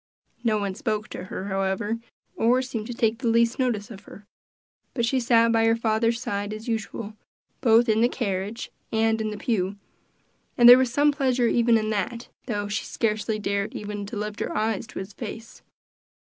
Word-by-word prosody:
No 220 -3 +2
one 200 -2 -2
spoke 215 +1 -3
to 180 - -7
her, 185 +1 -6
however, 195 +4 -1 0.4
or 245 +3 +3
seemed 230 -4 -5
to 245 - -5
take 225 -1 +1
the 255 - -2
least 230 +2 +2
notice 235 -5 -1
of 200 -2 -11
her; 205 - -13 0.7
but 235 -3 +1
she 260 +3 +1
sat 230 -1 +4
by 225 0 +3
her 225 0 +4
father's 230 0 +1
side, 205 -4 -3
as 215 +2 -8
usual, 220 -1 -4 0.5
both 235 -1 +5
in 220 0 +3
the 240 - +4
carriage 205 -1 -3 0.2
and 225 0 +1
in 215 - -1
the 210 - -5
pew, 200 -3 -1 0.8
and 240 - +7
there 245 +1 +11
was 260 -2 +1
some 290 +3 +3
pleasure 260 -4 +1
even 235 -1 +3
in 215 0 -1
that, 230 +4 -3 0.2
though 205 -4 -2
she 205 +1 -2
scarcely 215 -1 -1
dared 200 -1 -2
even 205 -1 -5
to 210 - -6
lift 210 0 -4
her - - -3
eyes 220 0 -1
to - - -11
his 190 +2 -6
face. 225 0 -8
225 Hz, 190 wpm, -25 LUFS, 210-235 Hz, 0.8 s, there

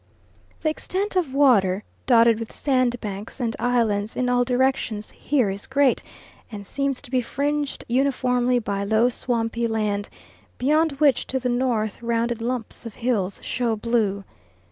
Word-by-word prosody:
The 310 - +1
extent 385 +6 -3
of 345 -7 +1
water, 210 -9 +4 0.2
dotted 230 -3 +5
with 230 - -6
sandbanks 240 -6 -1
and 230 -3 -1
islands 225 -3 +1
in 250 -1 0
all 245 0 +3
directions, 250 -4 0
here 255 -9 0
is 195 +1 -6
great, 275 -1 +2 0.5
and 205 -2 -7
seems 275 +3 -2
to 245 - -12
be 255 -1 +2
fringed 290 +3 -2
uniformly 250 -1 +2
by 200 -4 -2
low 220 +4 +3
swampy 235 -1 -1
land, 210 -2 -1 0.5
beyond 305 +4 +2
which, 275 -2 +2
to 265 - -1
the 250 0 -1
north, 240 -4 0
rounded 235 0 -1
lumps 240 -1 -3
of 230 -3 -8
hills 215 -6 -1
show 235 -2 -1
blue. 210 -3 0
240 Hz, 145 wpm, -23 LUFS, 220-260 Hz, 0.5 s, dotted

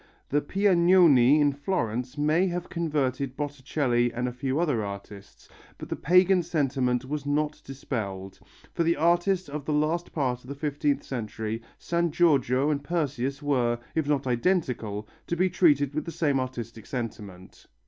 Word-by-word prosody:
The 145 +1 +2
Piagnoni 170 -7 +5
in 145 -1 +4
Florence 130 - -2
may 155 +5 +2
have 175 0 -4
converted 140 -6 -1
Botticelli 135 -4 0
and 125 +1 -2
a - - -2
few 130 +3 -2
other 145 -10 +1
artists, 100 0 -9 0.3
but - - -9
the - - -2
pagan 180 +3 +4
sentiment 135 -6 0
was 145 +1 -4
not 150 +1 -1
dispelled. 100 -8 -5 0.3
For - - -1
the 170 0 +3
artist 175 +4 +2
of 145 0 -5
the 155 - -1
last 155 +4 0
part 125 -5 -1
of 125 - -14
the 140 - -5
XVth 145 0 -1
century 110 -2 -4 0.2
San 170 0 0
Giorgio 145 -4 +2
and 145 -1 -2
Perseus 145 -4 -2
were, 125 -5 +1 0.2
if 160 -3 -1
not 145 -2 +1
identical, 120 - -1 0.2
to 170 - -1
be 185 +1 +2
treated 145 -6 +3
with 155 0 -2
the 170 - -5
same 145 -5 +1
artistic 120 -4 -6
sentiment. 105 -7 -7
145 Hz, 160 wpm, -27 LUFS, 125-160 Hz, 0.3 s, Piagnoni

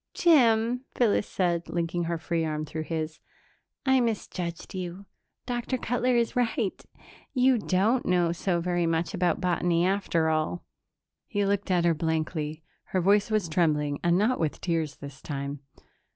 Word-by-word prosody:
"Jim," 245 -6 +4
Phyllis 220 -4 +2
said, 170 -2 -1
linking 170 0 -1
her 170 0 -1
free 165 0 -1
arm 155 -1 -2
through 155 +1 -5
his, 160 -1 -3 0.7
"I 265 -1 +4
misjudged 190 -7 -3
you. 185 +1 -5 0.4
Dr. 245 +1 -2
Cutler 245 +1 0
is 235 +2 +1
right. 235 -4 0 0.5
You 255 -1 +4
don't 210 +6 +2
know 175 -2 +3
so 175 0 0
very 175 -1 0
much 165 +2 0
about 180 -2 +1
botany, 175 -1 +1
after 185 -4 +1
all." 160 +2 -1 0.6
He 205 -6 0
looked 200 0 0
at 175 -2 +2
her 170 - +4
blankly. 155 -1 -2 0.2
Her 185 - -1
voice 200 +4 +3
was 215 -5 +1
trembling, 150 -3 +1
and 175 0 +3
not 220 +6 +2
with 155 -3 -1
tears 165 -4 -1
this 140 -2 -10
time. 140 -1 -4
175 Hz, 150 wpm, -27 LUFS, 160-215 Hz, 0.7 s, Jim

